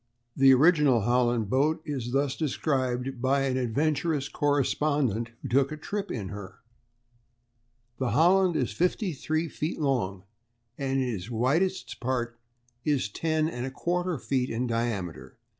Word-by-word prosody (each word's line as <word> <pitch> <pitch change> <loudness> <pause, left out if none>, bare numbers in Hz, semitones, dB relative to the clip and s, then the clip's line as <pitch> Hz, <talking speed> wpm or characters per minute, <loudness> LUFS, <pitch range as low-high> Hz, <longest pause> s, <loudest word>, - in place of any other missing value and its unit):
_] - - -48 0.3
The 135 0 +6
original 145 - +5
Holland 120 0 +2
boat 150 +5 +2
is 130 -5 -3
thus 140 0 +1
described 130 -4 -1
by 135 +1 +2
an 130 -1 0
adventurous 145 +4 0
correspondent 145 -5 +1
who - - -3
took 135 +3 +2
a 155 - -4
trip 205 +6 -4
in 100 -6 -4
her: 100 -2 -9 1.4
"The 130 -2 0
Holland 175 +7 +4
is 125 -7 0
fifty 180 - 0
three 155 +3 -1
feet 155 +1 -4
long, 110 -10 -1 0.5
and 135 0 -1
in 130 - 0
its 105 -3 -4
widest 145 +12 0
part 120 -1 -2 0.4
it 150 - +1
is 130 -8 -1
10 155 +6 0
1/4 170 +6 -2
feet 130 -2 0
in 120 +3 -1
diameter. 115 -8 -3
135 Hz, 140 wpm, -27 LUFS, 120-155 Hz, 1.4 s, The